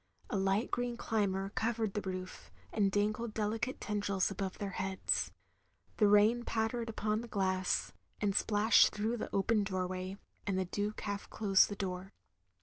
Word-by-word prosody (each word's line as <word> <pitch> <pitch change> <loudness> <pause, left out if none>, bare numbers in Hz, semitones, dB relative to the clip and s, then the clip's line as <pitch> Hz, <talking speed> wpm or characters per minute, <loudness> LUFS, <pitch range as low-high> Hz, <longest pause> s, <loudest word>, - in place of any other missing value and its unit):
A - - 0
light 195 +4 +1
green 245 -1 -1
climber 195 -4 0
covered 225 -2 0
the 210 - -1
roof, 185 - -6 0.2
and 200 -2 +2
dangled 215 +3 0
delicate 220 +4 -1
tendrils 200 -2 0
above 195 -1 -3
their 200 -1 -3
heads; 190 0 0 0.7
the 210 - +5
rain 210 +4 +5
pattered 230 +1 -1
upon 215 0 -1
the 240 - -8
glass, 190 -3 0 0.3
and 200 -2 0
splashed 210 +1 +5
through 220 +3 0
the - - -4
open 210 +2 +2
doorway; 185 0 -3 0.3
and 195 -2 +1
the 190 - +1
Duke 205 +3 -3
half 200 -1 -4
closed 195 -3 +4
the 205 - -4
door. 190 -1 -4
205 Hz, 155 wpm, -33 LUFS, 195-220 Hz, 0.7 s, the